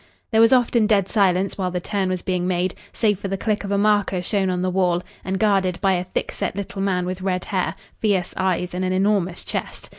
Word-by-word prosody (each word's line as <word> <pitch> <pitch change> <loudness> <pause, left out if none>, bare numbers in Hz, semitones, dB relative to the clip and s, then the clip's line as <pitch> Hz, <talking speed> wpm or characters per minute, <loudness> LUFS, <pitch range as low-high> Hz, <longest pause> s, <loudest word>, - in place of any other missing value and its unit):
There 220 0 +4
was 230 - +6
often 240 -3 +4
dead 200 -4 +3
silence 195 -2 +1
while 185 -1 0
the 180 0 -2
turn 190 +1 -1
was 185 -1 -2
being 180 -1 -1
made, 180 0 0 0.2
save 210 -4 +1
for 200 - -4
the 195 0 -2
click 215 0 -1
of 200 - -5
a 200 - +1
marker 205 -3 +2
shown 195 0 0
on 180 0 -1
the 185 - 0
wall 180 -1 +1 0.2
and 190 0 -2
guarded 195 -4 +2
by 195 -2 +3
a 180 0 -1
thick 180 - -3
set - - -3
little 200 0 -5
man 185 -2 0
with 185 +1 -4
red 185 -1 -1
hair, 190 -1 -1 0.2
fierce 195 -5 0
eyes, 185 -1 -1
and 180 +1 -2
an 185 0 0
enormous 190 -2 +1
chest. - - -5
190 Hz, 235 wpm, -22 LUFS, 180-200 Hz, 0.2 s, was